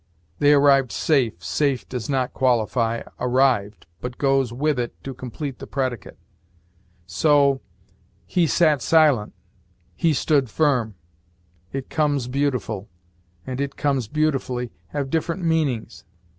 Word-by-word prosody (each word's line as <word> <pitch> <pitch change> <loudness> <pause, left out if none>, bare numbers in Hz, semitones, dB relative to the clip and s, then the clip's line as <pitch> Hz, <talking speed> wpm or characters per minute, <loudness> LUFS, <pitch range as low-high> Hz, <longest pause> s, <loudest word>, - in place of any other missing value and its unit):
'They 145 0 +5
arrived 140 -3 +5
safe': 120 - 0
'safe' 135 - 0
does 125 -2 -5
not 130 -2 0
qualify 115 -2 +1 0.2
'arrived,' 125 -5 +1
but 125 0 -6
goes 135 -3 +2
with 140 +2 0
it 120 -1 -3
to 135 - -5
complete 130 +2 -6
the - - -8
predicate. 130 -6 -3 0.9
So, 140 - +3 0.6
'he 175 -2 +1
sat 155 -4 +3
silent,' 150 -10 +3 0.6
'he 160 - +2
stood 140 -2 +1
firm.' 125 -6 +1 0.8
'It 135 -1 -5
comes 145 -5 0
beautiful' 125 -7 -2 0.6
and 130 +1 -4
'it 140 -1 -3
comes 135 -6 0
beautifully' 130 -4 -1 0.2
have 140 -2 -4
different 165 +2 -1
meanings. 155 -9 -1
135 Hz, 120 wpm, -23 LUFS, 120-145 Hz, 0.9 s, They